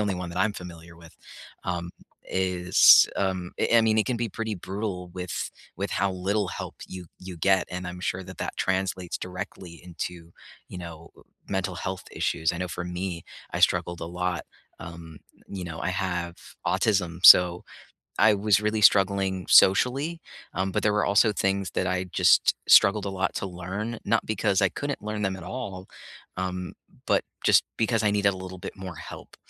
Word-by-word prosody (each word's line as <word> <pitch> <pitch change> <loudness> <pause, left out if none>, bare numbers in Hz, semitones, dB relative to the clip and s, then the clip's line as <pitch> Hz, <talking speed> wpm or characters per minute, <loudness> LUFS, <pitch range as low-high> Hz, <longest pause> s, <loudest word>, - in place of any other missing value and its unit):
only 100 -2 0
one 90 -1 -5
that 85 - -5
I'm 105 +2 +2
familiar 85 -2 -11
with, 85 -1 -16 0.5
um, 85 -1 -3 0.3
is, 90 -1 +5
um 95 -2 -1
I - - +1
I - - +6
mean 110 -1 +2
it 110 - +2
can 125 -2 -1
be 115 -1 -2
pretty 110 +1 -4
brutal 95 0 -5
with 90 -1 -5 0.3
with 100 +2 -3
how 95 0 0
little 100 +2 -1
help - - -7
you 90 -2 -9
you 90 -1 -9
get, 95 +3 +2
and 90 0 -5
I'm 90 0 -7
sure 95 +1 -2
that 95 +1 -11
that - - -4
translates 95 -2 -2
directly 90 -1 -7
into, 85 -1 -7 0.4
you 90 - -8
know, 85 -1 -10 0.4
mental 95 -1 -2
health 95 +2 -5
issues. 80 0 0
I 90 - -5
know 90 0 -3
for 85 0 -5
me, 90 -1 -5 0.3
I - - -3
struggled 85 -1 +2
a - - -4
lot. 90 0 -3 0.3
Um, 80 -1 -10 0.3
you 95 -2 -6
know, 85 -1 -7
I - - -2
have 90 -2 -3 0.3
autism, 90 -5 0
so 90 -1 +8 0.5
I 110 -1 +6
was 100 0 +2
really 105 0 0
struggling 95 -2 +3
socially. 135 - +4 0.3
Um, 95 +1 -1
but - - -1
there 105 - +2
were 105 0 +1
also 105 +2 +4
things 95 -1 -1
that 95 - -1
I 90 0 -1
just 90 - +3
struggled 100 +1 +6
a - - -2
lot 95 0 -2
to - - -2
learn, 95 +6 -5
not 115 +2 +1
because 100 -2 +1
I 95 - +5
couldn't 145 -1 -4
learn 105 0 -4
them 95 -1 -1
at 95 - -10
all, 95 -2 -6 0.5
um, 90 0 -4 0.3
but - - +2 0.2
just - - +5
because 115 -1 +1
I 105 - +3
needed 100 -1 +2
a - - -8
little 95 0 -8
bit 95 +3 -8
more 95 -3 -8
help. - - -11
95 Hz, 185 wpm, -26 LUFS, 90-100 Hz, 0.5 s, so